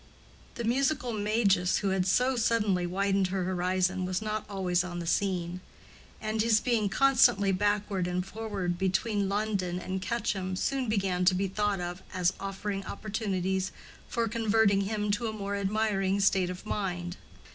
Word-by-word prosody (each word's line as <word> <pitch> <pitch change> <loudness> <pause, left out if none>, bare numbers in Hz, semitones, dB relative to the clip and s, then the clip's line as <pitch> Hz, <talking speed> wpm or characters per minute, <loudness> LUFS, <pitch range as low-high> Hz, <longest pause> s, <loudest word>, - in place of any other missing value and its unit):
The 235 - -4
musical 250 +1 +1
Magus 205 -4 +2
who 200 - 0
had 190 -1 +1
so 250 +7 +3
suddenly 210 -6 +1
widened 195 +1 +1
her 185 0 -2
horizon 185 +1 0
was 185 0 -1
not 215 0 -3
always 180 -3 0
on 175 -1 -5
the 170 - -4
scene; 180 0 -1 0.6
and 215 0 -1
his 220 -1 +4
being 225 -4 +1
constantly 245 -6 +4
backward 200 -1 0
and 180 0 -1
forward 195 -5 -3
between 195 +2 0
London 200 -4 -1
and 185 +1 -4
Quetcham 190 -4 -2
soon 260 +4 -1
began 190 -4 0
to 185 0 +5
be 195 +1 0
thought 205 0 0
of 175 +1 -5
as 180 0 +2
offering 195 0 -4
opportunities 190 -3 -2 0.4
for 235 -2 -1
converting 220 -3 +2
him 210 +1 -1
to 230 +3 -1
a 220 - -3
more 200 -1 -3
admiring 200 -1 0
state 195 -2 +3
of 180 +2 -7
mind. 180 -4 -3
195 Hz, 155 wpm, -29 LUFS, 185-215 Hz, 0.6 s, to